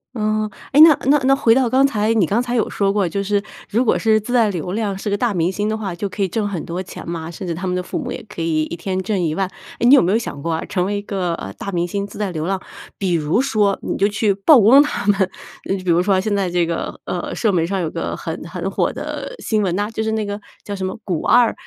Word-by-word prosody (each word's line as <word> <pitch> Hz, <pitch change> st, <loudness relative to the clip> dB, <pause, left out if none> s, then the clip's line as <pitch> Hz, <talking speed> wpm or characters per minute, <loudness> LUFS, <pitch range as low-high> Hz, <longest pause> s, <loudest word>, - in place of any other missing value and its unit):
嗯。 215 Hz, -1 st, 0 dB, 0.2 s
诶， 280 Hz, -, +4 dB
那 315 Hz, -3 st, +9 dB
那 285 Hz, +2 st, +5 dB
那 270 Hz, +1 st, +5 dB
回 240 Hz, -5 st, +4 dB
到 260 Hz, -3 st, +2 dB
刚 265 Hz, +3 st, +4 dB
才， 220 Hz, -4 st, +1 dB
你 215 Hz, -5 st, +3 dB
刚 210 Hz, +8 st, +1 dB
才 245 Hz, 0 st, -2 dB
有 225 Hz, -, +1 dB
说 200 Hz, -1 st, +1 dB
过， 200 Hz, -2 st, +1 dB
就 195 Hz, +4 st, -2 dB
是 205 Hz, 0 st, +1 dB, 0.3 s
如 230 Hz, +4 st, +2 dB
果 -, -, +3 dB
是 220 Hz, -1 st, +3 dB
自 215 Hz, +4 st, -5 dB
带 230 Hz, -4 st, +4 dB
流 180 Hz, -2 st, -4 dB
量 205 Hz, -1 st, -2 dB
是 205 Hz, -, -4 dB
个 200 Hz, -, 0 dB
大 235 Hz, 0 st, 0 dB
明 175 Hz, -1 st, +1 dB
星 205 Hz, +2 st, -2 dB
的 220 Hz, -, -1 dB
话， 200 Hz, -5 st, -4 dB
就 200 Hz, +4 st, -3 dB
可 200 Hz, -, -6 dB
以 -, -, +1 dB
挣 205 Hz, +3 st, -1 dB
很 190 Hz, -5 st, -4 dB
多 175 Hz, +2 st, -4 dB
钱 185 Hz, -, -10 dB
嘛， 165 Hz, -1 st, -4 dB
甚 185 Hz, +2 st, -7 dB
至 170 Hz, -, -1 dB
他 185 Hz, +3 st, -4 dB
们 180 Hz, -, -1 dB
的 180 Hz, -, -2 dB
父 185 Hz, -, -5 dB
母 250 Hz, -4 st, -5 dB
也 -, -, -6 dB
可 190 Hz, -, -6 dB
以 160 Hz, -1 st, +1 dB
一 155 Hz, -, -5 dB
天 185 Hz, +2 st, -3 dB
挣 195 Hz, 0 st, -1 dB
10000。 170 Hz, +3 st, 0 dB, 0.3 s
诶， -, -, +1 dB
你 270 Hz, -, +8 dB
有 -, -, +6 dB
没 180 Hz, +2 st, +1 dB
有 220 Hz, -, +4 dB
想 180 Hz, -11 st, -5 dB
过 165 Hz, +2 st, -1 dB
啊， 160 Hz, -, -2 dB
成 180 Hz, -2 st, -1 dB
为 205 Hz, +1 st, -1 dB
一 -, -, -3 dB
个， 190 Hz, -4 st, -2 dB
呃， 95 Hz, -8 st, -7 dB
大 200 Hz, -, -7 dB
明 175 Hz, -1 st, 0 dB
星 200 Hz, +2 st, -3 dB
自 205 Hz, -, -12 dB
带 205 Hz, -3 st, -2 dB
流 155 Hz, -2 st, -3 dB
量。 190 Hz, +1 st, -1 dB, 0.4 s
比 190 Hz, -3 st, -1 dB
如 160 Hz, +7 st, +1 dB
说 210 Hz, -7 st, +1 dB
你 -, -, -3 dB
就 200 Hz, -, +3 dB
去 210 Hz, 0 st, +1 dB
曝 220 Hz, +9 st, +6 dB
光 255 Hz, +8 st, +8 dB
他 295 Hz, -8 st, -2 dB
们， 200 Hz, -1 st, +3 dB, 0.5 s
呃， 195 Hz, -, +2 dB
比 185 Hz, -, -3 dB
如 170 Hz, +1 st, +4 dB
说， 190 Hz, 0 st, +2 dB
现 205 Hz, +2 st, -1 dB
在 195 Hz, -3 st, 0 dB
这 175 Hz, -1 st, +1 dB
个， 165 Hz, 0 st, -4 dB
呃， -, -, -3 dB
社 220 Hz, -, +1 dB
媒 170 Hz, -4 st, +1 dB
上 190 Hz, +1 st, -2 dB
有 160 Hz, -, -1 dB
个 -, -, -3 dB
很 -, -, -5 dB
很 -, -, -4 dB
火 -, -, 0 dB
的 -, -, -6 dB
新 215 Hz, -1 st, 0 dB
闻 180 Hz, -3 st, 0 dB
呐， 205 Hz, +2 st, -1 dB
就 220 Hz, -, -3 dB
是 220 Hz, -, -1 dB
那 220 Hz, -1 st, -1 dB
个 205 Hz, 0 st, -4 dB, 0.2 s
叫 205 Hz, -, -5 dB
什 190 Hz, -1 st, -3 dB
么 185 Hz, -, -4 dB
古 175 Hz, -7 st, -2 dB
二 245 Hz, -2 st, +4 dB
200 Hz, 310 characters per minute, -20 LUFS, 180-220 Hz, 0.5 s, 那